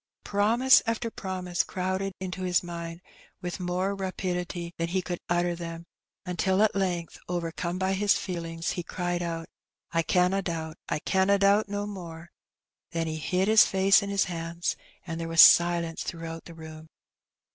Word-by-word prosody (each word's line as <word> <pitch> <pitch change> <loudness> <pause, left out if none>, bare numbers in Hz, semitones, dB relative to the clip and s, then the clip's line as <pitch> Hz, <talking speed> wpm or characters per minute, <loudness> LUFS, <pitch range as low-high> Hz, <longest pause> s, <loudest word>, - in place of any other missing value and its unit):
Promise 230 +6 +4
after 230 0 -1
promise 185 -3 -2
crowded 190 +1 -2
into 185 0 -5
his 180 -1 +1
mind 170 0 -6 0.4
with 180 +1 -5
more 180 +2 -1
rapidity 180 -2 -3
than 165 - 0
he 185 +2 0
could 175 -1 -4
utter 175 0 +1
them; 165 -1 -7 0.4
until 190 +2 +1
at 215 - +3
length, 180 -4 -2
overcome 170 0 -3
by 190 +1 0
his 200 +1 +3
feelings, 165 -2 -4
he 175 - -3
cried 175 0 -3
out, 165 -1 -4 0.3
" - - -53
I 165 - +2
canna 180 +4 +2
doubt, 160 -3 -4
I - - 0
canna 190 +5 +2
doubt 200 +1 +3
no 205 0 -2
more! 170 -4 -8 0.3
" - - -62
then 165 0 -1
he 160 -1 -3
hid 180 +5 0
his 220 0 +8
face 195 +2 +4
in 200 - -4
his 200 -1 +2
hands, 170 0 -3 0.3
and 165 -2 -5
there 165 - -3
was 165 0 -1
silence 170 -1 +5
throughout 165 -1 -6
the 170 - -11
room. 160 -1 -10
180 Hz, 170 wpm, -27 LUFS, 165-190 Hz, 0.4 s, his